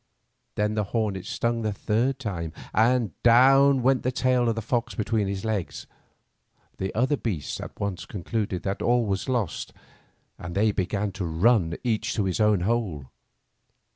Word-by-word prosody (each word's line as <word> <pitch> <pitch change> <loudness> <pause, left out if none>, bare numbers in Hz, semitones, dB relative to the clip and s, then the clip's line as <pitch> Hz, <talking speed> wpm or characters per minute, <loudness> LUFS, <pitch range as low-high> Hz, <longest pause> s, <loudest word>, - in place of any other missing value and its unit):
Then 105 0 0
the 105 -1 0
hornet 100 -3 -2
stung 115 0 -1
the 110 -1 -1
third 115 +6 0
time, 90 -10 -4 0.2
and 115 -2 +3
down 135 +2 +6
went 130 0 +3
the 130 - 0
tail 125 -1 +2
of 115 - 0
the 115 - -3
fox 120 +1 -1
between 110 -2 0
his 100 +1 -4
legs. 95 -10 -3 0.9
The 95 0 -2
other 130 +6 +2
beasts 100 - -4
at - - -9
once 100 -3 -3
concluded 100 -1 -3
that 100 0 -3
all 120 -1 +2
was 100 +3 -2
lost, 120 -9 -2 0.7
and 85 +1 -7
they 105 +2 +3
began 100 +1 -1
to 95 -1 -4
run 85 +1 +2
each 115 +1 -1
to 105 - 0
its 95 +2 -1
own 105 -3 +3
hole. 90 - -2
110 Hz, 165 wpm, -26 LUFS, 95-120 Hz, 0.9 s, down